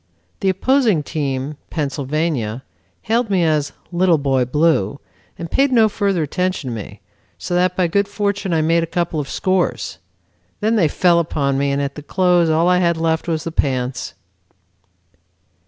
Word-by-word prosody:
The 195 - +1
opposing 215 - +2
team, 140 -1 -3
Pennsylvania, 140 -5 -2 0.4
hailed 230 +1 0
me 190 -3 +2
as 155 -3 +1 0.2
'Little 175 -1 +3
Boy 135 -3 +1
Blue,' 140 -5 +1 0.4
and 170 - -7
paid 275 0 +2
no 225 -3 +5
further 200 -5 0
attention 180 -3 -2
to - - -4
me, 105 - -8 0.4
so - - -5
that 180 0 +2
by 185 - +2
good 200 +4 +1
fortune 200 -2 -2
I 160 -2 +2
made 165 +2 +3
a 165 - -2
couple 170 -2 -2
of 140 - -4
scores. 185 -1 -1 0.6
Then 220 +2 +1
they 185 -8 +3
fell 170 +3 +3
upon 140 -4 -1
me, 140 0 +1
and 140 - 0
at 140 0 -2
the 150 - -9
close 180 +1 +2
all 160 +2 +2
I 180 0 +4
had 170 -2 +2
left 160 0 0
was 160 -2 -1
the 165 - -4
pants." 130 -4 -2
165 Hz, 170 wpm, -19 LUFS, 145-185 Hz, 0.6 s, no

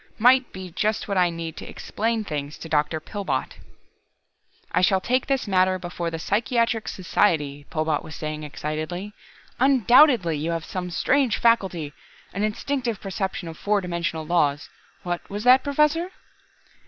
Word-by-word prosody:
"Might 250 +3 +4
be 185 -1 -8
just 215 +5 -1
what 200 - -2
I 180 -1 +4
need 165 -1 -5
to - - -8
explain 225 +1 -2
things 150 -5 -5
to - - -8
Dr. 155 0 +1
Pillbot." 155 -6 -4 1.1
"I 180 - +2
shall 190 +1 +4
take 250 +6 0
this 270 -4 0
matter 185 -1 +3
before 175 -1 -4
the 165 - -4
Psychiatric 225 +4 0
Society," 150 -6 0
Pillbot 155 -1 0
was 160 - -9
saying 155 0 -4
excitedly. 155 +7 -5 0.5
"Undoubtedly 245 - +5
you 150 +3 -2
have 165 -1 -3
some 180 -1 -4
strange 255 +6 +2
faculty 190 -10 +1 0.4
an 200 - -3
instinctive 235 +1 -2
perception 190 -2 -4
of 165 -1 -9
four 205 0 +1
dimensional 170 -3 -3
laws... 150 -4 +1 0.3
what 175 -2 -4
was 205 +1 -4
that, 255 +1 +6
Professor?" 300 +5 +2
185 Hz, 150 wpm, -24 LUFS, 160-230 Hz, 1.1 s, that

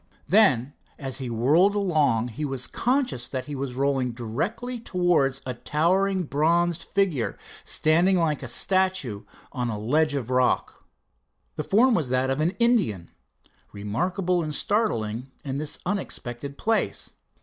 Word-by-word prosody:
Then 145 - +4 0.2
as 135 -3 -3
he 130 -2 -4
whirled 150 - +3
along 150 - +1
he 120 +7 -6
was 135 -3 -1
conscious 250 - 0
that 130 0 -4
he 150 - -7
was 135 -2 -4
rolling 135 -2 0
directly 175 - -3
towards 175 - +1
a 130 - -2
towering 185 +9 +1
bronzed 165 +3 +1
figure, 185 - -1 0.3
standing 175 +5 +3
like 155 -4 0
a 130 - -5
statue 185 - +1 0.3
on 125 -3 -2
a 110 - -3
ledge 150 +8 +1
of 130 -3 -3
rock. 125 0 0 0.7
The 150 - -3
form 235 +9 +4
was 155 - 0
that 130 +1 +1
of 135 +3 -1
an 170 +4 +1
Indian, 200 - +1 0.6
remarkable 175 - -1
and 155 -2 -3
startling 125 - -1 0.2
in 135 -1 -3
this 150 0 +1
unexpected 140 -8 -4
place. 215 - 0
150 Hz, 140 wpm, -25 LUFS, 125-185 Hz, 0.7 s, Then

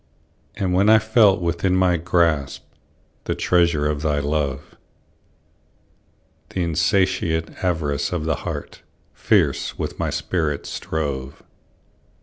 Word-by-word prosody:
And 95 -2 -1
when 100 +3 +3
I 110 - +8
felt 110 -3 +3
within 85 +2 0
my 95 -1 +3
grasp, 80 -4 0 0.6
The - - -1
treasure 85 -4 +2
of 75 -1 -1
thy 75 -1 0
love; 70 -1 -2 1.8
The 90 - -2
insatiate 85 0 0
avarice 75 -5 -1
of 85 -3 -2
the 80 -2 0
heart - - -6 0.3
Fierce - - +1
with - - -5
my - - -1
spirit 80 -5 -2
strove. 70 -4 -4
85 Hz, 115 wpm, -22 LUFS, 75-90 Hz, 1.8 s, I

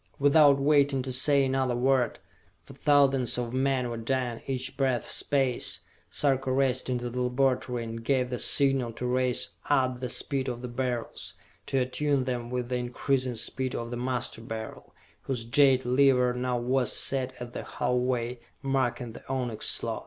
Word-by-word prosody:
Without 145 0 +5
waiting 140 -2 +3
to 130 - -4
say 135 +2 +4
another 130 -2 0
word, 125 -1 +1 0.5
for 135 - -13
thousands 140 -3 +3
of 120 -1 -3
men 130 -1 +1
were 120 -1 -4
dying 120 0 -2
each 130 -2 -3
breath 130 -3 -1
space, 135 -4 0 0.3
Sarka 135 -2 0
raced 130 -1 +1
into 125 -1 -2
the 125 +1 -3
laboratory 125 -1 0
and 115 0 -6
gave 130 0 +1
the 125 - -2
signal 135 -4 +2
to 125 - -5
race 125 0 +1 0.2
up 130 -3 +2
the 125 -1 -4
speed 135 +1 -1
of 120 -1 -4
the - - -3
Beryls, 120 -1 -4 0.3
to 135 - -1
attune 135 +2 0
them 120 -2 -3
with 125 -1 -3
the 125 - 0
increasing 125 +1 -1
speed 130 +3 -1
of 115 0 -4
the - - -3
Master 125 -2 -2
Beryl, 110 -1 -8 0.3
whose 125 -4 -3
jade 130 0 +4
lever 125 -1 +3
now 125 0 -1
was 125 0 +1
set 130 -1 +2
at 120 0 -8
the - - -4
halfway 125 -1 -1 0.2
mark 130 -3 0
in 120 -2 -6
the - - -11
onyx 125 -4 -1
slot. - - -1
125 Hz, 170 wpm, -28 LUFS, 120-135 Hz, 0.5 s, Without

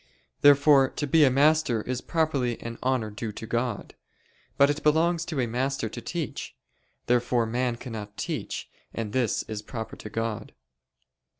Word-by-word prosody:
Therefore 140 -1 +6
to 145 - -3
be 155 +2 +4
a 140 - +6
master 140 -4 +3
is 130 0 -3
properly 140 -8 0
an 115 0 -7
honor 125 -4 0
due 110 +1 -5
to 115 - -7
God. 120 -1 -2 0.6
But 140 +1 +6
it 145 - -4
belongs 165 +2 +2
to 155 -5 -3
a 125 - +2
master 125 0 -1
to 120 - -7
teach. 160 +7 -5 0.5
Therefore 120 -1 +2
man 120 +1 -1
cannot 110 -4 -8
teach, - - -4 0.3
and 110 -3 -4
this 125 -5 +1
is 110 -1 -6
proper 110 +1 -6
to 105 - -8
God. 115 0 -3
125 Hz, 160 wpm, -27 LUFS, 115-145 Hz, 0.6 s, Therefore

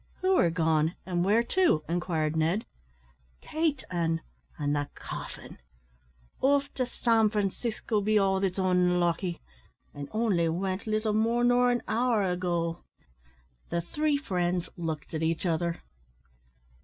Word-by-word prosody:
"Who 375 0 +3
are 175 - +4
gone, 160 -1 +1
and 175 -2 0
where 210 +5 +3
to!" 335 - +2
inquired 165 -2 -1
Ned. 165 +7 +1 0.7
"Kate 310 -3 -1
an' 165 -2 0 0.4
an' 145 -1 0
the 145 -1 -1
caffin. - - -8 0.8
Off 280 +1 +2
to 255 -2 -1
San 225 -3 +2
Francisco, 210 +1 -1
be 215 +1 +2
all 195 -1 +3
that's 190 -1 -1
onlucky; 180 -1 +1 0.5
an' 145 -1 -7
only 205 -7 +1
wint 185 +4 -2
little 215 0 0
more 230 +3 +2
nor 245 0 +4
an 245 0 0
hour 235 -2 +2
ago." 175 -2 -1 0.9
The 170 - 0
three 295 - 0
friends 180 - -1
looked 160 -4 -5
at 160 - -2
each 165 +2 0
other. 170 0 -1
185 Hz, 130 wpm, -28 LUFS, 170-225 Hz, 0.9 s, are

